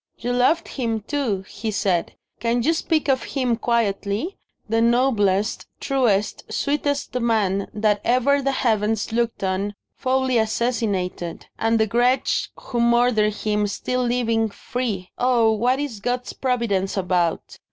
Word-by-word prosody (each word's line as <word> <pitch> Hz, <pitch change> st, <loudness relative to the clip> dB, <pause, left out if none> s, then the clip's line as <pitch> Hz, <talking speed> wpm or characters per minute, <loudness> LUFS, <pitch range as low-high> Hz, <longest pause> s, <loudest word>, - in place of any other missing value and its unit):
"You 245 Hz, +1 st, -2 dB
loved 255 Hz, +7 st, +2 dB
him 230 Hz, -4 st, -2 dB
too!" 220 Hz, -6 st, -2 dB
he 220 Hz, -, -5 dB
said. 195 Hz, -4 st, 0 dB, 0.2 s
"Can 235 Hz, 0 st, 0 dB
you 320 Hz, +6 st, +3 dB
speak 320 Hz, -2 st, 0 dB
of 265 Hz, -2 st, +2 dB
him 255 Hz, -4 st, -1 dB
quietly? 225 Hz, -, -1 dB, 0.3 s
The 225 Hz, +1 st, +1 dB
noblest, 225 Hz, -5 st, +2 dB
truest, 235 Hz, -7 st, 0 dB
sweetest 285 Hz, 0 st, -1 dB
man 210 Hz, -5 st, +1 dB
that 210 Hz, -1 st, +1 dB
ever 260 Hz, +4 st, +3 dB
the 275 Hz, 0 st, +1 dB
Heavens 220 Hz, -4 st, 0 dB
looked 230 Hz, -2 st, -1 dB
on, 195 Hz, +2 st, -1 dB, 0.2 s
foully 260 Hz, -2 st, +1 dB
assassinated. 215 Hz, -6 st, -1 dB
And 225 Hz, 0 st, +2 dB
the 220 Hz, -, +4 dB
wretch 245 Hz, +4 st, +1 dB
who 240 Hz, -, -4 dB
murdered 235 Hz, -3 st, +3 dB
him 210 Hz, -1 st, 0 dB
still 250 Hz, +5 st, -2 dB
living, 230 Hz, -2 st, +1 dB
free 210 Hz, -3 st, -4 dB
oh, 240 Hz, -3 st, +3 dB
what 245 Hz, +5 st, +1 dB
is 280 Hz, -8 st, -4 dB
God's 245 Hz, +3 st, -2 dB
providence 230 Hz, -7 st, -1 dB
about? 180 Hz, -3 st, -1 dB
230 Hz, 135 wpm, -22 LUFS, 205-250 Hz, 0.3 s, the